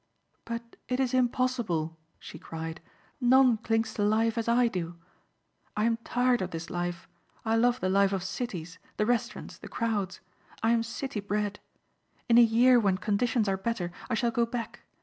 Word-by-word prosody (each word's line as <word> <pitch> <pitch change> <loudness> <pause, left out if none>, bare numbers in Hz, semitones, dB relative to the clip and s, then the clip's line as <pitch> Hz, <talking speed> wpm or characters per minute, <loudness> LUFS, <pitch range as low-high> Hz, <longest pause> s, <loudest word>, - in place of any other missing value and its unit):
"But 235 0 -6
it 250 0 -1
is 260 -1 +1
impossible," 240 - 0 0.2
she 160 - -10
cried. 160 +1 -6 0.4
"None 255 -1 +5
clings 225 0 0
to 205 - -1
life 220 +2 +2
as 230 -1 -2
I 240 +1 +4
do. 175 -5 -4 0.8
I 210 - +2
am 230 0 +2
tired 245 +1 +1
of 185 - -2
this 165 -1 -6
life. 175 -1 -3 0.4
I 225 0 +2
love 245 +2 +3
the - - +1
life 195 +1 +3
of 190 -2 -1
cities, 185 -4 -5 0.2
the 210 - +2
restaurants, 240 0 -2
the - - -9
crowds. 210 -5 -2 0.4
I 225 - +4
am 235 -1 +3
city 235 +1 -4
bred. 205 0 -2 0.7
In 235 -1 +6
a - - +10
year 240 +2 +6
when 195 -4 +2
conditions 220 +2 +1
are 195 -1 +1
better 190 -4 -2 0.2
I 235 - +1
shall 235 +1 +1
go 235 0 +1
back. 235 0 -5
225 Hz, 175 wpm, -29 LUFS, 190-240 Hz, 0.8 s, a